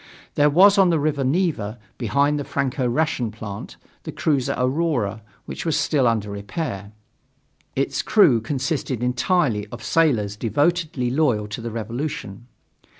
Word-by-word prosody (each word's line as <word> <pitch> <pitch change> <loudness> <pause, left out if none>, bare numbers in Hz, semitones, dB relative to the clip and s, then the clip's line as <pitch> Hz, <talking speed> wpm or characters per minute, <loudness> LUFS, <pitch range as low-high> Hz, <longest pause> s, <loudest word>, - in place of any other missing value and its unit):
There 145 0 +4
was 195 +6 +6
on 190 -2 +5
the 165 - +2
river 145 -2 0
Neva, 130 - 0 0.2
behind 140 +6 +1
the - - -2
Franco 135 -2 -1
Russian 125 -2 0
plant, 105 -2 -8 0.2
the - - -7
cruiser 140 -5 0
Aurora, 125 -6 0 0.2
which - - -6
was 165 -1 0
under 115 -7 +2
repair. 100 - -5 0.8
Its - - 0
crew 115 -2 +4
consisted 135 -1 -2
entirely 125 - +1
of 115 +1 -10
sailors 115 -12 +2
devotedly 145 - 0
loyal 125 -8 +1
to 110 - -5
the 115 - -4
revolution. 115 -1 -5
130 Hz, 135 wpm, -22 LUFS, 110-150 Hz, 0.8 s, was